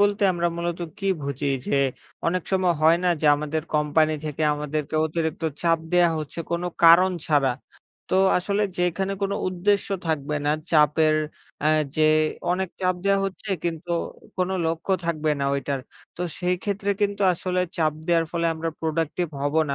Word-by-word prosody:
বলতে 205 0 +2
আমরা 175 -1 0
মূলত 170 0 -2 0.2
কি 195 - -3 0.2
বুঝি? 140 0 -2 0.2
যে, - - +1 0.5
অনেক 180 +1 +1
সময় 185 -2 +3
হয় 165 +2 +6
না? - - +3
যে, 155 - +1
আমাদের 150 +1 -2
কোম্পানি 155 +1 +2
থেকে 155 0 -3
আমাদেরকে 150 0 -4
অতিরিক্ত 160 +1 -3 0.2
চাপ 165 -1 +3
দেয়া 175 -1 +5
হচ্ছে 155 +2 -7
কোন 170 +1 -1 0.2
কারণ 170 +3 +8 0.2
ছাড়া। 140 -4 +3 0.6
তো - - +3 0.2
আসলে 200 +3 -1 0.2
যেখানে 180 +2 0
কোনো 200 0 0
উদ্দেশ্য 195 +3 +1 0.2
থাকবে 150 -1 -1
না 150 - +3 0.2
চাপের 155 0 +4 0.5
আ - - +5 0.3
যে, 155 0 +4 0.4
অনেক 185 0 -1
চাপ 185 -1 +2
দেওয়া 195 0 +3
হচ্ছে, 195 +2 -7
কিন্তু 170 0 -3 0.4
কোন 185 -1 0 0.2
লক্ষ্য 165 +4 -1
থাকবে 155 -2 0
না - - 0
ওইটার। 140 -1 -2 0.4
তো 180 - -3 0.2
সেইক্ষেত্রে 195 +3 -1
কিন্তু 205 0 0
আসলে 180 +1 -2 0.2
চাপ 155 -3 +2
দেওয়ার 165 -1 +2
ফলে 170 -1 0
আমরা 165 +1 -3
প্রোডাক্টিভ 165 +2 -1 0.2
হবো 145 +3 +2
না - - 0
165 Hz, 160 wpm, -24 LUFS, 155-185 Hz, 0.6 s, কারণ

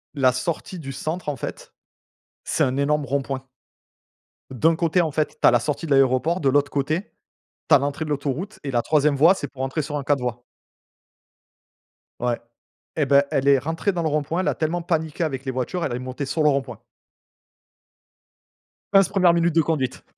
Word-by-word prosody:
La 130 -2 +4
sortie 165 +7 -4
du 135 -3 -6
centre 155 +5 -4
en 145 - -2
fait, - - -7 0.7
c'est - - +1
un 130 0 -1
énorme 145 +1 +1
rond 140 +1 0
point. 135 -1 -5 1.1
D'un 160 +6 +2
côté 170 +2 +2
en 160 -3 -1
fait, 155 +1 -2
tu - - +5
as - - +7
la 120 - +4
sortie 150 +6 -3
de 155 - -6
l'aéroport, 135 +6 +3
de 140 - +3
l'autre 145 +1 +2
côté, 155 +8 -2 0.6
tu 155 - +7
as - - +8
l'entrée 140 +3 -2
de 155 - -6
l'autoroute, 145 +8 -3
et 140 - -4
la 120 -2 +1
3e 150 0 +2
voie 165 +7 +6
c'est 145 - -5
pour 130 +1 -7
rentrer 135 +4 -1
sur 150 +1 -4
un 145 - -3
4 140 -1 +1
voies. 120 -1 -4 1.8
Ouais, 120 -1 0 0.6
et 150 - +2
bah, 140 +1 +5
elle 135 +1 0
est 140 -1 +6
rentrée 165 +8 -1
dans 175 - -2
le 160 - 0
rond-point, 150 +4 -1
elle 185 - -2
a - - -1
tellement 165 +2 -1
paniqué 160 -1 -1
avec 135 -4 -3
les 130 - -1
voitures, 130 +8 -2
elle 120 - -2
est - - -4
montée 130 +2 -5
sur 145 +4 -1
le 150 - +5
rond-point. 135 -5 -2 2.1
Pince 195 -2 +6
1re 185 -4 +4
minute 170 0 +2
de 165 - +4
conduite. 150 -5 -2
145 Hz, 200 wpm, -23 LUFS, 135-160 Hz, 2.1 s, as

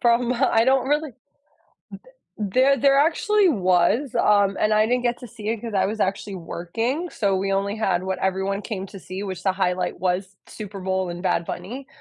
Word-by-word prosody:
from 240 0 +3
uh, 260 +2 +2
I 225 0 +4
don't 265 0 +2
really 295 0 +1
th - - -36 1.2
there 255 +7 +3
there 275 0 +4
actually 385 +6 +3
was, 195 - +2
um, 205 -3 +3
and 215 0 +2
I 215 0 +4
didn't 245 +2 0
get 240 0 0
to 245 - -9
see 215 -1 -6
it 225 -1 -2
'cause 230 -2 -6
I 190 -1 +2
was 215 +3 -3
actually 195 0 -1
working, 225 - -3
so 200 -8 0
we 195 +1 -1
only 200 +1 -1
had 185 -5 0
what 190 0 -3
everyone 190 +1 -1
came 195 -3 -5
to 195 - -11
see, 185 +2 -6
which 185 -3 -6
the 190 - +2
highlight 180 -2 -1
was 185 +2 -1
Super 205 -2 -8
Bowl 190 -1 -1
and 175 +1 -6
Bad 170 -2 +1
Bunny, 260 +11 -6
205 Hz, 205 wpm, -23 LUFS, 190-245 Hz, 1.2 s, I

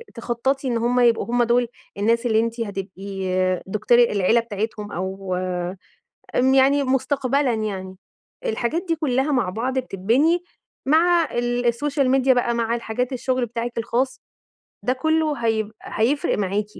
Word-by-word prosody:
تخططي 260 +3 -1
إن 235 - 0
هُم 240 +2 +1
يبقوا 235 -2 +3
هُم 240 +1 +1
دول 240 +1 +2 0.3
الناس 230 +4 +1
اللي 220 -2 +3
أنتِ 230 +1 -1
هتبقي 195 -1 -5 0.4
دكتورة 215 +4 +3
العيلة 210 +1 +2
بتاعتهم، 210 -1 -4
أو 190 +1 -3 1.0
آمم 260 +1 +4
يعني 275 +1 +4
مستقبلًا 270 0 +1
يعني، 195 -4 -4 0.5
الحاجات 340 - -1
دي 330 - +1
كلها 280 -1 0
مع 240 -9 +1
بعض 255 +6 -1
بتتبني 255 - +1 0.4
مع 335 +2 +4
ال 240 0 -1
السوشيال 275 +2 +1
ميديا 265 -1 +4
بقى، 240 -1 +1
مع 230 0 0
الحاجات 240 +2 -3
الشغل 255 0 0
بتاعِك 235 +1 -5
الخاص، 240 +3 -1 0.6
ده 255 - +1
كله 315 +3 +1
هيب 220 -1 0
هيفرق 280 +9 0
معاكِ، 200 +1 -1
240 Hz, 140 wpm, -22 LUFS, 220-265 Hz, 1.0 s, آمم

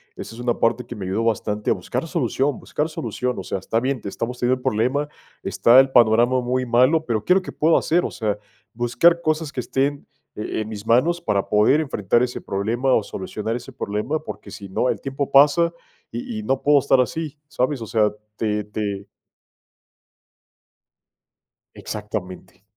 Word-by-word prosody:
esa 115 - -8
es 120 - -11
una 120 -1 0
parte 115 +1 +1
que 120 - -8
me 100 - -6
ayudó 100 +5 -1
bastante 105 -2 -1
a - - +5
buscar - - -4
solución 140 0 0
buscar 150 +2 -2
solución, 125 -3 -3
o 95 - -4
sea, - - -3
está 115 +5 -1
bien, 130 -1 -1
te - - -8
estamos 115 +5 -4
teniendo 125 +1 +2
el - - -17
problema, 135 +7 0 0.3
está 125 +3 +6
el 135 - -2
panorama 120 +1 +4
muy 125 +1 -1
malo, 130 +7 +3
pero 110 -3 -1
¿qué 180 - +5
es - - +3
lo 190 - +3
que 185 - -8
puedo 160 +2 +3
hacer? 175 +2 +1
O - - -3
sea, 105 -3 -2 0.4
buscar 125 +9 +3
cosas 155 -1 -1
que - - -5
estén, 140 +3 -1 0.3
e 110 +1 -3
en 110 - -5
mis 105 -1 -7
manos 160 +9 +3
para 100 - -1
poder 110 +9 +4
enfrentar 120 - +1
ese 125 - -3
problema 115 +7 -1
o 110 - +3
solucionar 105 +4 -4
ese 130 +1 -11
problema, 120 +6 -2
porque - - -8
sí 100 -2 -9
no, 110 +6 0
el - - -1
tiempo 135 +1 -3
pasa 150 +5 +5 0.4
y 115 -2 -5
y - - -6
no 135 +4 0
puedo 145 -1 +5
estar 135 -2 +3
así, 155 +3 -3
¿sabes? 130 -1 -1
O 110 - -5
sea, 105 0 +2 0.3
te 105 -1 -1
te. 100 -1 -4 2.7
Exactamente. 95 -3 -7
120 Hz, 185 wpm, -22 LUFS, 105-140 Hz, 2.7 s, está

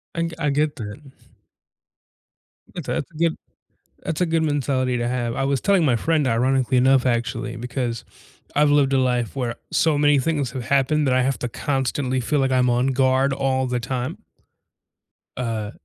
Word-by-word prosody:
I 170 0 -1
I 150 -3 +1
get 150 +1 0
that. 105 +4 -7 1.7
That's - - -6
a - - 0
that's 145 - -3
a - - -21
good 165 +1 +1 0.7
that's 165 +1 -3
a 180 - +3
good 165 -1 +1
mentality 135 -4 0
to 120 0 -1
have. 120 -2 -2
I 135 - -1
was 140 -1 0
telling 195 -5 +3
my 125 -5 +3
friend, 155 +3 +1
ironically 130 +2 +1
enough, 130 +1 +4
actually, 120 0 -1
because 120 -1 -4 0.5
I've 145 0 +4
lived 140 -2 +3
a 135 - +3
life 125 -2 0
where 120 -3 -3 0.2
so 160 -3 +2
many 145 -1 +4
things 145 -2 -1
have 125 -2 -5
happened 140 +2 +2
that 130 - +2
I 130 - +3
have 135 +1 0
to 125 - -2
constantly 130 0 -1
feel 145 +5 0
like 135 -1 +1
I'm 125 -1 +3
on 125 +2 +2
guard 135 +1 +2
all 135 -1 0
the 125 -1 -1
time 125 0 -4 1.2
uh, 110 -4 -3
130 Hz, 180 wpm, -22 LUFS, 125-145 Hz, 1.7 s, enough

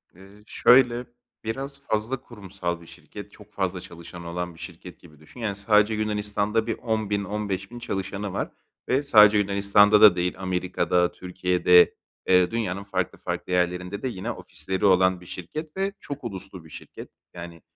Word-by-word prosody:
Eee, 100 +3 -17
şöyle, 125 -1 +4 0.4
biraz 135 +5 -5
fazla 120 +1 -2
kurumsal 95 -6 -6
bir 85 - -15
şirket, 105 0 -12
çok 105 0 -17
fazla 95 -2 -2
çalışanı 85 0 -11
olan 90 -1 -4
bir - - -17
şirket - - -10
gibi 75 -1 -18
düşün. 75 +10 -16
Yani 105 -4 -2
sadece 105 +1 +3
Yunanistan'da 105 +1 0
bir 115 - -2
10.000, 110 -3 -1
15.000 100 +2 -4
çalışanı 100 -2 -4
var - - -3 0.4
ve 135 +3 +2
sadece 105 -6 +7
Yunanistan'da 100 +1 +4
da 105 -4 +9
değil, 90 0 -1
Amerika'da, 90 -1 0
Türkiye'de, 90 -1 +3 0.3
eee, 90 -1 +4
dünyanın 100 -4 -2
farklı 95 -3 -3
farklı - - -5
yerlerinde 90 +2 -1
de 130 - -2
yine 95 -7 -4
ofisleri 95 +2 -4
olan 95 -1 +4
bir - - -14
şirket 150 - -7
ve 195 +1 -1
çok 145 -2 -8
uluslu 95 -5 -6
bir 80 - -15
şirket. - - -11 0.2
Yani, 85 -2 -9
100 Hz, 160 wpm, -25 LUFS, 90-110 Hz, 0.4 s, da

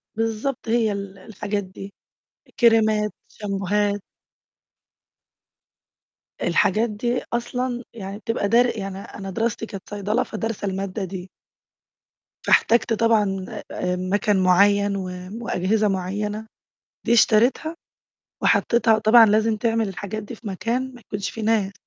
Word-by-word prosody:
بالضبط 225 +4 -2
هي 225 -2 +2
ال 200 -1 -6
الحاجات 205 0 -4
دي 195 +1 -10 0.7
كْرِيمَات، 220 -3 +4
شامبوهات. 205 0 -1 2.4
الحاجات 220 +5 +2
دي 240 +4 -1
أصلًا 245 +1 -2
يعني 200 -3 -7
بتبقى 230 -2 -1
در 240 +1 +3
يعني 195 -2 -5
أنا 195 0 -8
دراستي 225 +3 -1
كانت 195 -3 -9
صيدلة 205 +2 0
فدارسة 220 -2 -4
المادة 195 +1 -3
دي. 185 0 -6 1.2
فاحتاجت 235 0 +4
طبعًا 210 -4 +2 0.7
مَكَن 205 0 +2
معيّن 200 +2 +4
و 190 -2 -3 0.4
وأجهزة 210 +4 +1
معيّنة 205 +3 -2 0.6
دي - - +3
اشتريتها 240 +8 +3 0.7
وحطيتها 230 -2 +3
طبعًا 225 +2 +7
لازم 215 +1 +2
تعمل 225 0 0
الحاجات 200 +2 -5
دي 205 - -8
في 225 - -14
مكان 240 +7 -2
ما 245 - -13
يكونش 205 -3 -4
فيه 225 - -7
ناس. 215 -3 +1
210 Hz, 115 wpm, -23 LUFS, 200-230 Hz, 2.4 s, طبعًا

